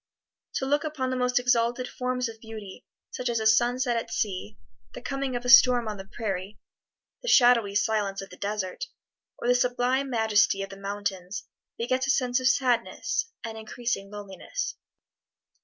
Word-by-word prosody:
To - - 0
look 290 +2 +1
upon 290 -5 -2
the - - 0
most 250 0 +1
exalted 245 0 +2
forms 250 0 -2
of 225 -1 -10
beauty, 220 -1 -9 0.2
such 250 - -3
as 235 -1 0
a 220 - -3
sunset 240 +3 +3
at 230 - -3
sea, 185 - -3 0.4
the - - -7
coming 275 -2 -2
of 245 0 -4
a - - -2
storm 245 -1 +7
on 210 -1 -4
the 195 0 -9
prairie, 195 -2 -4 0.6
the - - -9
shadowy 240 - +5
silence 205 -2 +1
of 195 0 -8
the - - -10
desert, 205 - -3 0.5
or - - -4
the 245 - +6
sublime 250 +2 +1
majesty 220 -4 +3
of 195 - -8
the - - -8
mountains, 195 0 -4 0.3
begets 255 +3 0
a - - -2
sense 250 -2 +2
of 255 - +1
sadness, 250 - +1
an 225 -1 -6
increasing 220 -2 -3
loneliness. 205 - -5
235 Hz, 170 wpm, -27 LUFS, 205-250 Hz, 0.6 s, storm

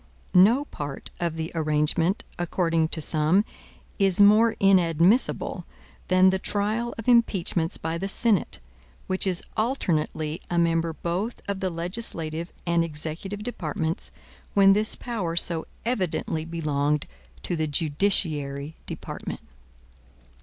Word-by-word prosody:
No 225 +10 +5
part 145 - -7
of 170 -2 -1
the 160 0 -4
arrangement, 160 +4 +1 0.2
according 165 -2 0
to 160 - -2
some, 160 +7 +4 0.5
is 195 -2 +2
more 215 +3 +6
inadmissible 185 +3 +2 0.4
than 185 0 +5
the 190 - -1
trial 215 +5 -2
of 225 - -8
impeachments 190 -8 +2
by 165 +1 -3
the 195 - -3
Senate, 215 0 +3 0.5
which 190 +1 0
is 180 -2 +1
alternately 165 - -1
a 175 - -1
member 165 -1 +1
both 175 +9 -3
of 200 -1 -3
the 190 -1 -1
legislative 170 -2 -3
and 170 -1 +2
executive 165 +6 -5
departments, 160 -7 -3 0.5
when 195 -1 +6
this 215 +2 +3
power 200 -9 -4
so 170 -1 +1 0.2
evidently 180 -8 -2
belonged 150 -3 -1 0.4
to 175 - -2
the 160 -1 -1
judiciary 150 -2 0
department. - - -7
170 Hz, 120 wpm, -25 LUFS, 160-200 Hz, 0.5 s, more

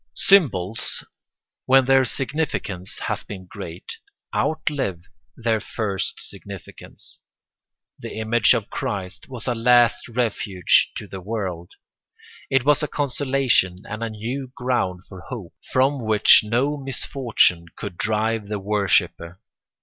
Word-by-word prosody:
] - - -50 0.2
Symbols, 115 - +3 0.6
when 135 0 +6
their 135 0 +5
significance 125 - -3
has - - -2
been 95 -3 -9
great, 85 -1 -8 0.4
outlive 140 - -1 0.3
their 115 -2 +1
first 100 -3 -3
significance. - - -11 0.8
The - - -7
image 110 +2 +4
of 115 -3 -4
Christ 95 +2 -4
was 125 -3 -7
a 125 - +1
last 120 0 +4
refuge 110 -6 +2
to - - -5
the 95 - -8
world; 95 -4 -4 0.8
it 135 -2 +2
was 150 +1 +4
a 150 - -1
consolation 135 -9 +1
and 110 +2 -6
a 115 - -2
new 120 +5 -5
ground 120 -8 -1
for 95 -3 -11
hope, 110 -9 -7 0.2
from 135 0 +2
which 110 -1 +7
no 125 +7 0
misfortune 125 -10 +1
could 100 -4 -6
drive 110 +1 0
the 105 0 -3
worshipper. 100 -3 0
115 Hz, 125 wpm, -23 LUFS, 100-130 Hz, 0.8 s, which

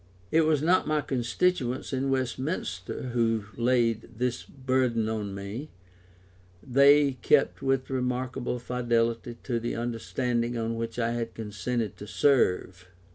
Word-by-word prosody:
It 160 0 +4
was 155 -2 +2
not 180 +3 +3
my 155 -1 +2
constituents 130 +2 0
in 135 +1 0
Westminster 130 - -2
who 115 -3 +1
laid 115 -2 +1
this 125 0 -1
burthen 130 -4 0
on 105 -3 -3
me: 100 +10 -6 0.9
they 140 0 +5
kept 140 +2 +3
with 135 -1 0
remarkable 125 -1 -2
fidelity 120 -1 -1
to 120 -3 -1
the 120 +1 -3
understanding 120 +1 -1
on 115 0 -1
which 115 0 -4
I 115 -1 +1
had 115 -1 -3
consented 110 0 -3
to 105 - -9
serve. 95 -9 +2
120 Hz, 130 wpm, -28 LUFS, 115-130 Hz, 0.9 s, they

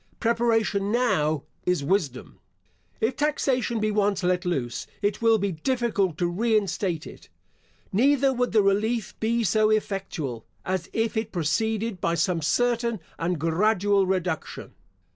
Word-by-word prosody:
Preparation 225 -4 +1
now 180 - +1 0.2
is 180 -5 0
wisdom. 145 -6 -1 0.6
If 230 +3 +1
taxation 265 -5 0
be 215 0 0
once 205 -2 +1
let 180 0 +1
loose, 135 -9 -2 0.2
it 205 +2 0
will 225 -1 +5
be 200 -1 -1
difficult 205 - 0
to 175 - 0
re 220 +6 +1
instate 185 -4 -2
it; - - -12 0.6
neither 270 +5 +3
would 245 0 0
the 215 -2 +4
relief 210 +3 +1
be 230 +1 +1
so 215 +1 +3
effectual, 195 - -2 0.2
as 185 -2 -2
if 225 +1 -1
it 220 0 -2
proceeded 210 +5 -1
by 170 - +1
some 170 -1 0
certain 235 +5 +1 0.2
and 175 +1 0
gradual 195 +4 +2
reduction. 180 -4 -3
205 Hz, 140 wpm, -25 LUFS, 180-230 Hz, 0.6 s, will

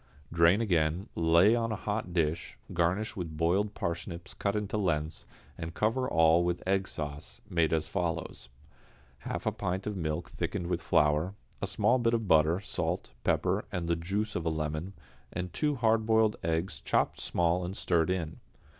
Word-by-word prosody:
Drain 85 +5 +5
again, 85 -1 +1
lay 85 +6 +5
on 115 -1 0
a - - 0
hot 105 -2 -3
dish, 80 -1 -1 0.2
garnish 90 +7 0
with 85 -5 -5
boiled 95 +6 +1
parsnips 85 0 -4
cut 100 0 -1
into 105 0 -2
lengths, 80 -6 -1 0.3
and 80 0 -5
cover 120 +4 +1
all 80 +1 +5
with 85 0 -1
egg 95 0 +2
sauce, 70 -5 -6
made 85 -3 +1
as 80 -1 +1
follows: 85 -6 -3 0.7
half - - -5
a - - +2
pint 95 +2 -3
of 105 - -3
milk 80 -1 -2
thickened 85 - -3
with 90 - -1
flour, 75 +6 +2 0.3
a - - -1
small 130 - +2
bit 115 -1 +2
of 115 -2 -2
butter, 80 +1 +4
salt, 100 - -3
pepper, - - +1
the 85 -1 -1
juice 100 +6 -2
of 85 - -1
a 80 - +1
lemon, 80 +4 -3 0.4
and 90 -1 -4
two 150 -1 +1
hard 110 -3 +2
boiled 110 -1 +4
eggs 80 -3 -1
chopped - - +1
small 85 +1 +1
and 90 +3 -4
stirred 85 0 +2
in. 85 -4 -2
85 Hz, 170 wpm, -30 LUFS, 80-100 Hz, 0.7 s, Drain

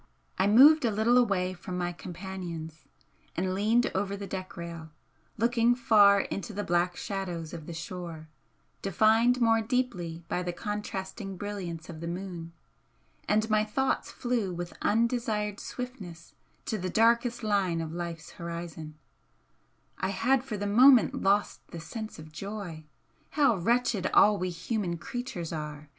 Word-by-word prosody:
I 190 - +4
moved 280 +9 +8
a 235 - +3
little 220 +3 +2
away 190 -6 +1
from 180 0 -6
my 175 0 -1
companions, 170 -3 -7 0.5
and 185 +2 0
leaned 220 +5 +2
over 200 +1 -1
the 200 - -6
deck 190 0 -6
rail, 170 -2 -7 0.5
looking 235 +1 +3
far 205 -4 +6
into 205 +4 -5
the 205 +1 -3
black 175 0 +1
shadows 180 -5 -4
of 160 -3 -8
the 170 - -6
shore, 165 -1 -7 0.5
defined 220 +6 +3
more 225 -1 +4
deeply 210 -9 -2
by 180 - -1
the 175 -1 -3
contrasting 195 0 -5
brilliance 180 -5 -5
of 160 -2 -8
the 170 - -5
moon, 175 -1 -5 0.8
and 215 +1 +2
my 215 0 +4
thoughts 265 +5 -1
flew 240 -6 -1
with 175 0 -5
undesired 220 -2 0
swiftness 195 -10 -8 0.3
to 215 - -2
the 185 0 -3
darkest 235 +3 +2
line 195 -5 +1
of 160 -1 -4
life's 170 -2 -6
horizon 170 -2 -7 1.0
I 190 - 0
had 245 +7 +2
for 235 -6 -5
the 205 - -3
moment 245 +4 +6
lost 200 +1 +1
the 170 - -8
sense 215 +7 -7
of 155 0 -11
joy. 180 -3 -6 0.5
How 275 -6 +5
wretched 225 +1 +1
all 205 -1 +6
we 185 +1 -1
human 175 0 -2
creatures 215 -3 -5
are! 150 -1 -6
195 Hz, 150 wpm, -29 LUFS, 170-225 Hz, 1.0 s, moved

